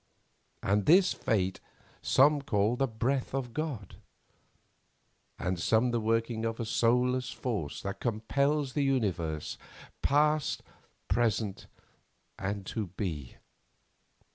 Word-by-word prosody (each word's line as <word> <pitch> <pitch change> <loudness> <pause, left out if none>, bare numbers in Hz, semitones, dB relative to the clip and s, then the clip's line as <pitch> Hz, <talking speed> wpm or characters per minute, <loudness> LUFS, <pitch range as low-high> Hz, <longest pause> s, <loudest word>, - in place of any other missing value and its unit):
And 100 0 +1
this 185 +2 +6
fate 95 -4 0 0.4
some 145 +2 +4
call 105 -3 +1
the 135 +2 +1
Breath 130 +4 -1
of 125 -3 -3
God, 145 - -4 1.4
and 90 0 -2
some 115 +7 +3
the 120 - +1
working 115 +1 0
of 115 0 -2
a 115 - -2
soulless 125 +3 +2
force 105 - -4
that 100 0 -4
compels 135 +5 0
the 145 - +1
universe, 95 - -1 0.4
past, 150 +1 +2 0.4
present, 110 -2 0 0.7
and 100 0 -3
to 105 +1 -3
be. 85 - -5
115 Hz, 110 wpm, -30 LUFS, 100-135 Hz, 1.4 s, this